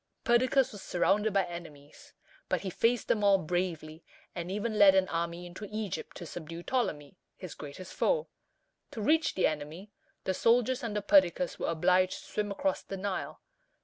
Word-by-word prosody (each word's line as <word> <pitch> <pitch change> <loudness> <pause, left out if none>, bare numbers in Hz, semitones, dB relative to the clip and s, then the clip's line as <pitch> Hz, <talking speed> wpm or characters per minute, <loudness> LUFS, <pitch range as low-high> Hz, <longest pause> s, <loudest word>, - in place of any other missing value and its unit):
Perdiccas 255 +2 +3
was 205 - -9
surrounded 205 +4 +1
by 195 -2 +2
enemies, 155 -5 -11 0.4
but - - 0
he 190 - -4
faced 230 +5 +1
them 210 - +1
all 200 -1 +6
bravely, 165 -2 -3 0.3
and 175 0 -5
even 210 +3 -2
led 195 -2 +8
an 190 -1 +3
army 170 +1 -3
into 180 +4 -8
Egypt 215 -3 -5
to 175 - -7
subdue 165 +1 -8
Ptolemy, 175 - -2 0.2
his 185 -5 -8
greatest 150 +5 -9
foe. 480 -1 +1 0.6
To - - -8
reach 315 +4 +2
the 185 - +2
enemy, 155 +7 -3 0.3
the 190 - 0
soldiers 245 +5 +2
under 210 -3 -2
Perdiccas 185 -3 +3
were - - -2
obliged 180 +3 +2
to - - -13
swim 210 -1 -1
across 280 +9 -1
the 195 - -7
Nile. 195 0 -4
190 Hz, 170 wpm, -30 LUFS, 170-215 Hz, 0.6 s, led